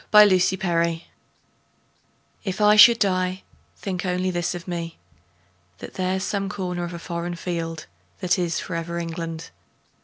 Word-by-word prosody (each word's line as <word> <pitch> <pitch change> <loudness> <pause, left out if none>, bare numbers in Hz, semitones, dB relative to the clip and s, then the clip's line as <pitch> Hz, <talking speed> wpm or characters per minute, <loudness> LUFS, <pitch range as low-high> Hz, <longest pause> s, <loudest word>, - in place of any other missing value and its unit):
The 210 -3 +7
Soldier 170 -3 +1 1.4
If 190 -2 -3
I 210 0 +6
should 230 +2 +9
die, 185 -2 0 0.3
think 185 -2 -4
only 185 0 0
this 175 0 -1
of 175 +1 -8
me: 170 -2 -4 0.8
That - - -9
there's 185 0 -1
some 195 -1 -2
corner 180 -2 -3
of 170 0 -6
a - - -5
foreign 170 +1 -4
field 165 -2 -4 0.3
That 180 +1 +1
is 170 -2 0
for 180 - -5
ever 170 +1 -3
England. 165 - -5
180 Hz, 145 wpm, -24 LUFS, 170-190 Hz, 1.4 s, should